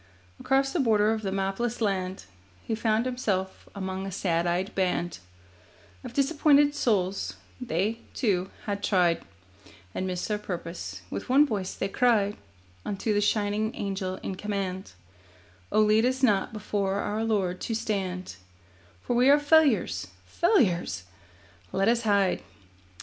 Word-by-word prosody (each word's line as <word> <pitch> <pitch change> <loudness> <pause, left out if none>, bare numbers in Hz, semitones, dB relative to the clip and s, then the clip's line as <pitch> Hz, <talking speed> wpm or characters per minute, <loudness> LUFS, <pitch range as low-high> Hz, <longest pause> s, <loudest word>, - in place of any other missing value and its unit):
Across 270 +1 +1
the 350 - 0
border 215 -5 +3
of 220 - -3
the 195 -2 -2
mapless 195 +5 -1
land 190 -4 -1 0.4
He - - -3
found 220 +1 +1
himself 205 -7 -2
among 190 -1 -4
a - - -5
sad 175 -2 0
eyed 180 +3 -1
band 180 -2 -1 0.8
Of - - -8
disappointed 290 +1 +4
souls; 200 -9 0 0.3
they, 220 0 -1 0.2
too, 190 -6 +1 0.2
had 200 -1 -2
tried 180 -5 +2 0.7
And 185 - -2
missed 180 -1 -3
their 210 -1 -1
purpose. 165 - -6
With 100 - -5
one 280 +4 +6
voice 200 -8 -3
they - - -2
cried 210 -2 +2 0.5
Unto 205 +2 -1
the 205 - +2
shining 210 +1 0
Angel 195 -2 -3
in - - -3
command: 195 - -4 0.8
'Oh, 215 - +4
lead 215 +1 +4
us 260 +2 0
not 205 -6 +3
before 200 -2 -2
our 210 +2 -1
Lord 195 -5 0
to 225 - -2
stand, 190 - -3 0.7
For 245 - -1
we 250 +3 +5
are 285 - +8
failures, 295 0 +3 0.2
failures! 185 - +1 0.7
Let 195 +1 +1
us 235 0 +3
hide. 200 -4 +2
205 Hz, 140 wpm, -27 LUFS, 190-235 Hz, 0.8 s, are